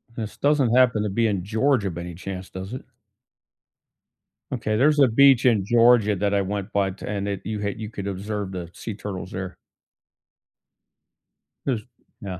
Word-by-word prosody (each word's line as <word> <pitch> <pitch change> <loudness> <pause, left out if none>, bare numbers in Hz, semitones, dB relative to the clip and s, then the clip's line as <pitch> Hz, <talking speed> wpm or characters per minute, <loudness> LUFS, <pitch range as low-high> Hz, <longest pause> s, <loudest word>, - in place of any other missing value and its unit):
This 110 -3 -6
doesn't 140 -5 +2
happen 120 -4 +4
to 105 - -1
be 115 +3 +1
in 100 -4 -1
Georgia 110 0 +1
by 85 +1 -6
any 85 -1 -7
chance, 95 +1 -7
does 95 +4 -7
it? 130 - -6 1.7
Okay, 110 -4 -1
there's 150 +3 +4
a 135 - +7
beach 135 +2 +5
in 110 -6 +4
Georgia 115 -1 +4
that 100 +2 0
I 100 - +3
went 100 0 -4
by 100 -1 +2
to 95 - -10
and 100 -1 -2
it 100 -2 -3
you 110 -1 -3
had 100 0 -3
you 110 -1 -5
could 100 -2 -6
observe 100 0 -4
the 90 -2 -5
sea 110 - -6
turtles 95 -3 -6
there. 95 -1 -6 2.1
There's 125 -6 0 0.4
yeah. 95 -4 -6
105 Hz, 175 wpm, -24 LUFS, 95-115 Hz, 2.1 s, a